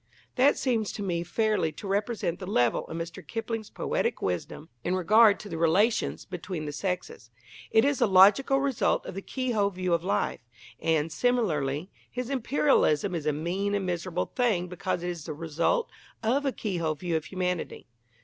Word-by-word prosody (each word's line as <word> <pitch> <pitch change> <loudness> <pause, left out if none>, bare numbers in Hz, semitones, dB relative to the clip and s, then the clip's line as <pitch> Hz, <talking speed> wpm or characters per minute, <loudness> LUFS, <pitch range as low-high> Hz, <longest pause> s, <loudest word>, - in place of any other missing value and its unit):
That 275 +3 +4
seems 230 -6 0
to 205 - -5
me 175 -3 -1
fairly 180 -1 0
to 200 - -8
represent 200 -3 -1
the 185 - -7
level 120 - +1
of 165 - -6
Mr. 170 +3 -6
Kipling's 225 +3 -4
poetic - - -1
wisdom 95 - -3
in 180 - 0
regard 210 +3 +5
to 210 - -9
the 165 - -5
relations 205 +8 +2
between 180 -3 -5
the 150 - -3
sexes. 175 -6 -4 0.4
It 220 - +4
is 285 -2 +1
the 240 - +4
logical 205 +9 +6
result 275 -3 +1
of - - -6
the 195 - -5
keyhole 235 -4 0
view 185 -2 -2
of 170 0 +1
life. 190 - 0 0.4
And, 160 -1 +1
similarly, 170 - 0 0.2
his 250 +1 -4
Imperialism 240 - +2
is 160 -3 -3
a - - +4
mean 180 +7 -1
and 200 -2 -1
miserable 180 0 -2
thing 215 -8 +1
because 180 0 -3
it 175 - -2
is 165 -3 -8
the 155 - -5
result 165 - 0 0.3
of 270 +6 +1
a - - +2
keyhole 170 -10 -2
view 170 +2 -2
of 160 -1 -1
humanity. 180 -2 -3
185 Hz, 180 wpm, -28 LUFS, 165-225 Hz, 0.4 s, logical